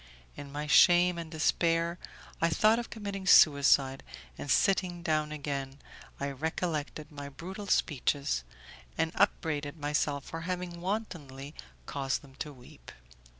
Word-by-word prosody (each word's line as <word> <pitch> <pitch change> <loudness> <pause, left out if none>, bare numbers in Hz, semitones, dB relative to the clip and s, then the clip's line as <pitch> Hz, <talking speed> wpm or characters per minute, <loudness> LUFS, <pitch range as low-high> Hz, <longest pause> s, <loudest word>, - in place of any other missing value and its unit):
In 140 -1 -9
my 150 +1 -4
shame 175 +3 +5
and 165 -1 -6
despair 165 +1 +1 0.4
I 165 - +4
thought 215 +7 +4
of 240 - -6
committing 200 -3 -6
suicide, 140 -5 +6 0.3
and 145 - -7
sitting 180 +3 +2
down 155 -2 0
again, 140 -2 -4 0.4
I 140 0 -2
recollected 155 +1 -3
my 145 -1 -7
brutal 190 +8 -8
speeches, 140 - 0 0.5
and 160 - +1
upbraided 155 -6 0
myself 145 -1 -1
for 165 - -6
having 175 0 -4
wantonly 155 -9 -4 0.3
caused 135 - -2
them 135 -2 -16
to 150 - -4
weep. 125 - -14
155 Hz, 130 wpm, -30 LUFS, 140-175 Hz, 0.5 s, suicide